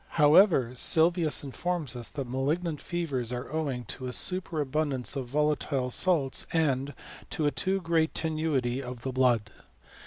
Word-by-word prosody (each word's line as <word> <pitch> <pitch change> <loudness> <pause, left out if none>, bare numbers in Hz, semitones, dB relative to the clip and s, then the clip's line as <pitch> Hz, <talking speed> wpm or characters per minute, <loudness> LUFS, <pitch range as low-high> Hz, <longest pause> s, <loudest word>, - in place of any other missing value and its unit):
Howeyer, 150 - +5
Sylvius 165 +4 +3
informs 150 0 -3
us 120 -2 -4
that 140 -4 -6
malignant 150 +5 -2
fevers 140 -9 -3
are 125 +1 -5
owing 140 -6 -2
to 130 +4 -5
a - - -4
superabundance 150 -6 +1
of 135 -3 -4
volatile 145 -2 0
salts 155 -4 +1
and 145 -4 0 0.3
to 155 - -2
a 145 - +2
too 185 +9 0
great 165 -2 0
tenuity 155 -6 -1
of 125 -2 -8
the 130 - -3
blood. 120 -5 +1
145 Hz, 145 wpm, -28 LUFS, 125-160 Hz, 0.3 s, Howeyer